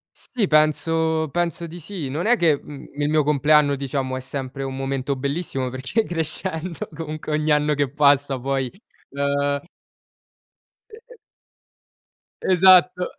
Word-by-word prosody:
Sì, 225 -7 -2
penso 160 +1 +2
penso 170 0 -2
di 175 +2 -10
sì. 165 -4 -6
Non 155 +6 -3
è 245 +2 +5
che, 160 -8 +2
mhmm, 145 -2 -11
il 145 0 -1
mio 155 -1 +3
compleanno 150 0 +3
diciamo 135 -1 -3
è - - -4
sempre 135 0 -6
un 135 0 -4
momento 135 0 -2
bellissimo 140 -1 -3
perché 135 - -1
crescendo 165 0 -2
comunque 155 -1 -6
ogni 155 0 0
anno 150 0 +2
che 145 -1 0
passa 140 -2 +3
poi, 135 0 -1 0.4
uhm 140 0 0 1.3
E - - -11
e - - -15 1.3
esatto. 185 -1 +5
150 Hz, 135 wpm, -22 LUFS, 140-165 Hz, 1.3 s, è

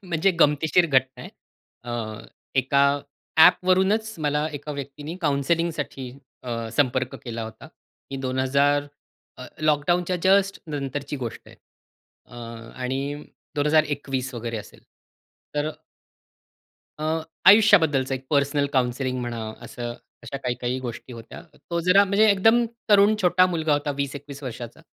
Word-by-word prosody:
म्हणजे 180 +1 +1
गमतीशीर 155 +4 +4
घटना 130 -3 +1
आहे. - - -9 0.5
अ, 120 - -5 0.6
एका 140 +1 +3 0.5
ॲपवरूनच 190 +6 +4
मला 150 0 0
एका 145 +1 -6
व्यक्तीने 145 +3 -7
काउंसिलिंगसाठी 150 -3 -1 0.3
अ, 115 -2 -4
संपर्क 130 -2 +1
केला 115 -1 -5
होता, 110 0 -9 0.4
की 135 - -4
2000 140 +3 +1 0.5
अ, 130 - -9
लॉकडाउनच्या 170 +4 +1
जस्ट 195 +1 +3
नंतरची 145 -1 -4
गोष्ट 120 -4 -6
आहे - - -15 0.7
अ, 120 - -14 0.5
आणि 135 +3 -3 0.3
2021 145 -4 0
वगैरे 115 -1 -4
असेल. 105 - -10 0.8
तर 150 +1 0 1.3
अ, 155 - -4 0.4
आयुष्याबद्दलचं 160 -11 +5
एक 130 0 -7
पर्सनल 140 0 +2
काउन्सिलिंग 130 0 0
म्हणा, 120 -1 -4 0.2
असं 120 -1 -6 0.3
अशा 140 - -6
काही-काही 125 0 -2
गोष्टी 125 0 -7
होत्या. 115 -1 -10 0.3
तो 170 0 0
जरा 195 +2 +6
म्हणजे 200 +2 +3
एकदम 225 +5 +4 0.3
तरुण 205 +1 +6
छोटा 180 0 +5
मुलगा 160 -4 0
होता, 145 0 0
20-21 140 0 -5
वर्षाचा. 120 +2 -7
145 Hz, 120 wpm, -24 LUFS, 130-170 Hz, 1.3 s, जरा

